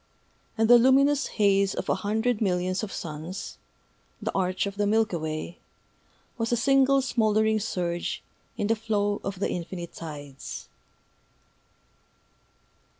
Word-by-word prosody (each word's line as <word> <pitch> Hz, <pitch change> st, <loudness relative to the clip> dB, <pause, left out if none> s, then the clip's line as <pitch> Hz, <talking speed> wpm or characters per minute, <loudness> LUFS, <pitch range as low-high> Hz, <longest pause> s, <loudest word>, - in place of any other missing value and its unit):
And 225 Hz, 0 st, +3 dB
the 240 Hz, +1 st, +8 dB
luminous 275 Hz, +3 st, +4 dB
haze 200 Hz, -2 st, +3 dB
of -, -, -4 dB
a -, -, +3 dB
hundred 220 Hz, +3 st, 0 dB
millions 185 Hz, -1 st, 0 dB
of 215 Hz, -3 st, -5 dB
suns, 160 Hz, +4 st, -6 dB, 0.6 s
the -, -, -2 dB
Arch 185 Hz, 0 st, 0 dB
of 200 Hz, -1 st, -4 dB
the 205 Hz, -1 st, +1 dB
Milky 215 Hz, -3 st, +2 dB
Way, 155 Hz, +2 st, -5 dB, 0.8 s
was 230 Hz, +1 st, -1 dB
a 240 Hz, -, +3 dB
single 270 Hz, +2 st, +4 dB
smouldering 220 Hz, -3 st, +2 dB
surge 175 Hz, -5 st, -2 dB, 0.3 s
in 205 Hz, -, -1 dB
the 225 Hz, +2 st, +2 dB
flow 205 Hz, -2 st, -1 dB
of 195 Hz, -1 st, -4 dB
the -, -, 0 dB
Infinite 175 Hz, 0 st, -5 dB
Tides. 145 Hz, -4 st, -8 dB
205 Hz, 130 wpm, -27 LUFS, 180-225 Hz, 0.8 s, the